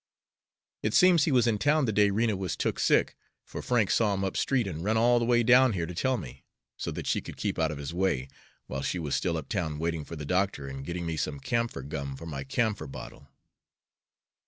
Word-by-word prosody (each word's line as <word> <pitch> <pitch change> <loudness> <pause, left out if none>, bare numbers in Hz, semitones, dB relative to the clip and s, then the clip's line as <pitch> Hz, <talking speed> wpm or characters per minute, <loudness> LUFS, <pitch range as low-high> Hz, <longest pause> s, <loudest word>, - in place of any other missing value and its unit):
It 105 - -1
seems 180 -4 +6
he 155 - +1
was 125 -3 +4
in 110 -3 +1
town 150 +2 +3
the 110 - 0
day 105 0 +4
Rena 110 +1 +1
was 95 -5 -3
took - - -2
sick, - - +3 0.3
for - - -7
Frank 115 -6 +1
saw 105 -3 +2
him 95 - -2
up 95 - -2
street 130 -4 +1
and 85 -4 -5
run 110 +3 +1
all 120 +2 +4
the 120 - 0
way 120 0 +3
down 125 0 +6
here 85 -4 -1
to 90 - -7
tell 130 +9 0
me, 75 - -9 0.3
so - - -4
that - - -5
she - - 0
could - - -10
keep - - -2
out 80 -1 +2
of 75 - -5
his 70 +3 -6
way, 85 -8 0 0.4
while 65 0 -4
she 90 - -2
was 75 -5 -3
still 85 -3 0
up 80 - -6
town 80 -7 -2
waiting 80 0 -2
for 85 - -8
the 75 -2 -6
doctor 90 -3 0
and 70 0 -7
getting 85 0 -3
me 80 -1 -3
some 75 -1 -2
camphor 115 - -2
gum 70 -1 -5
for 80 - -9
my 70 -4 -5
camphor 105 - -1
bottle. 70 - -10
95 Hz, 235 wpm, -28 LUFS, 75-115 Hz, 0.4 s, seems